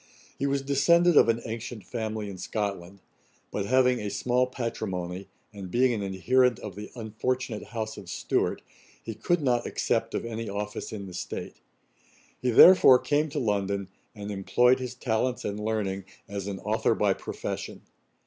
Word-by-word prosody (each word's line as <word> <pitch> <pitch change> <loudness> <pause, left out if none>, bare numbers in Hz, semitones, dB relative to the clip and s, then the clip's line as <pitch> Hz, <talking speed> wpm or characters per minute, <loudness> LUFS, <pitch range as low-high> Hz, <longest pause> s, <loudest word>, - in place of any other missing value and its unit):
He 140 - +1
was 140 0 0
descended 170 +5 +4
of 115 - +7
an 115 0 +1
ancient 115 -1 -6
family 110 0 -4
in 95 -2 -8
Scotland; 100 -2 -4 0.5
but 100 -1 -2
having 125 -1 +3
a 105 - -3
small 125 +5 +1
patrimony, 95 -7 -4 0.3
and 100 -3 -8
being 125 +5 +3
an 110 - -2
adherent 115 +6 +2
of 100 -4 -8
the 105 +1 -8
unfortunate 115 +1 -3
house 110 -1 -5
of 95 -4 -10
Stuart, - - -1 0.4
he 115 - -5
could 175 - 0
not 125 -3 +1
accept - - -1
of - - -2
any 115 -1 -4
office 105 +1 -4
in 100 -2 -6
the 95 - -9
state; 90 - -6 0.8
he 125 - +1
therefore 130 +1 +9
came 150 +4 0
to - - -6
London, 100 -4 -1 0.3
and 105 0 -6
employed 120 +6 +3
his 125 -1 -5
talents 125 0 -1
and 105 +1 -3
learning 100 -3 -2 0.2
as 100 -1 -5
an 100 -1 -4
'Authour - - +1
by - - +2
profession.' - - -6
110 Hz, 165 wpm, -27 LUFS, 100-125 Hz, 0.8 s, therefore